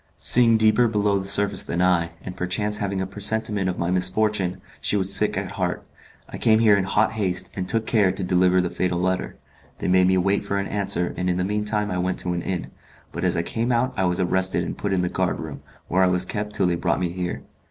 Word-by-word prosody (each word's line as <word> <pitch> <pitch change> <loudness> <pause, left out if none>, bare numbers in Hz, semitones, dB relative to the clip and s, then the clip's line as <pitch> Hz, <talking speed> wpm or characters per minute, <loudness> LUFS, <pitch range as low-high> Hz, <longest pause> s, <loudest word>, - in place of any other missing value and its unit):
Seeing 115 -2 +5
deeper 110 +2 +3
below 105 -2 0
the 95 - -6
surface 100 0 +3
than 85 - -3
I, 85 -2 +1
and 90 - -7
perchance 105 +3 -2
having 100 -2 -2
a - - -2
presentiment 105 0 0
of 90 - -4
my 85 +1 -2
misfortune, 95 0 0 0.2
she 105 - +1
was 95 0 +4
sick - - +3
at - - -4
heart. - - -3 0.4
I - - -9
came 110 -1 +4
here 110 -2 +4
in 95 -2 0
hot 105 +3 +1
haste, 95 -4 -2
and 90 -1 -4
took 115 -1 0
care 105 -5 +2
to 95 +1 -3
deliver 90 0 +2
the 90 - -3
fatal 90 -1 -1
letter. 95 +1 -2 0.4
They - - -4
made 90 0 +4
me 95 0 +2
wait 100 +2 0
for 100 - -3
an 100 - -2
answer, 95 -4 -1
and 90 0 -2
in 90 - 0
the 90 - -1
mean 105 +2 -2
time 105 -1 -1
I 90 - -2
went 90 +1 -1
to 90 - -2
an 85 - -3
inn; 90 0 -4 0.4
but 85 - -6
as 90 -1 +1
I 85 - 0
came 115 +7 -2
out 125 +2 0
I 95 - 0
was 90 +1 -1
arrested 95 -1 +2
and - - -5
put 100 - -4
in 95 -2 0
the - - 0
guard - - -2
room, - - -8 0.3
where 90 +2 +1
I 95 - +4
was 90 0 +3
kept 105 +2 -4
till - - +1
they 90 - +1
brought 85 0 -1
me 90 -2 -2
here. 90 0 -5
95 Hz, 250 wpm, -23 LUFS, 90-105 Hz, 0.4 s, Seeing